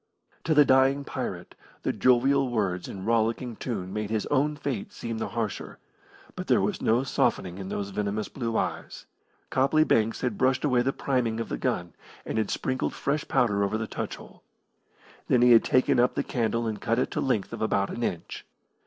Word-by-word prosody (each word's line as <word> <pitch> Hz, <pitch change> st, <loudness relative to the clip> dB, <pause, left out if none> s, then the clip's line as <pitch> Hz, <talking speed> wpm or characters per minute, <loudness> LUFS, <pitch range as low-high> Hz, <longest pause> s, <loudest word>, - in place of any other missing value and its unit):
To 160 Hz, -, +2 dB
the 150 Hz, -1 st, +7 dB
dying 135 Hz, +1 st, +4 dB
pirate -, -, -5 dB, 0.3 s
the -, -, 0 dB
jovial 130 Hz, +2 st, +3 dB
words 100 Hz, -6 st, -1 dB
and 95 Hz, -1 st, -7 dB
rollicking 115 Hz, +1 st, 0 dB
tune 95 Hz, -6 st, -4 dB
made 105 Hz, -1 st, -3 dB
his 110 Hz, -1 st, -1 dB
own 145 Hz, +2 st, +2 dB
fate 140 Hz, -8 st, -4 dB
seem 115 Hz, -1 st, -5 dB
the -, -, -2 dB
harsher, 115 Hz, -4 st, -4 dB, 0.6 s
but -, -, -6 dB
there -, -, +4 dB
was -, -, -1 dB
no 115 Hz, +4 st, +2 dB
softening 95 Hz, -8 st, 0 dB
in 95 Hz, -1 st, -6 dB
those 100 Hz, 0 st, -3 dB
venomous 105 Hz, +1 st, -2 dB
blue 115 Hz, -4 st, -3 dB
eyes. -, -, -3 dB, 0.5 s
Copley 140 Hz, +4 st, +3 dB
Banks 115 Hz, -6 st, +1 dB
had 125 Hz, -5 st, -2 dB
brushed 130 Hz, +1 st, +2 dB
away 125 Hz, -4 st, +3 dB
the 130 Hz, +2 st, +1 dB
priming 125 Hz, -5 st, -1 dB
of 115 Hz, -, -4 dB
the -, -, -2 dB
gun, -, -, -2 dB, 0.3 s
and 110 Hz, -, -2 dB
had 110 Hz, -, -1 dB
sprinkled 130 Hz, 0 st, -2 dB
fresh 150 Hz, +2 st, -1 dB
powder 110 Hz, -6 st, +2 dB
over 100 Hz, +2 st, 0 dB
the 110 Hz, -, -3 dB
touch -, -, -4 dB
hole. -, -, -15 dB, 0.9 s
Then 120 Hz, -1 st, +4 dB
he 125 Hz, -, +6 dB
had 115 Hz, -, +7 dB
taken 130 Hz, -1 st, +3 dB
up 125 Hz, +1 st, +3 dB
the -, -, 0 dB
candle 115 Hz, -1 st, -1 dB
and 110 Hz, -2 st, -3 dB
cut 115 Hz, 0 st, 0 dB
it 130 Hz, -, 0 dB
to -, -, -2 dB
the -, -, -1 dB
length 110 Hz, -7 st, 0 dB
of -, -, -6 dB
about 100 Hz, -2 st, +1 dB
an 120 Hz, -, -5 dB
inch. 85 Hz, -7 st, -4 dB
115 Hz, 200 wpm, -27 LUFS, 110-130 Hz, 0.9 s, the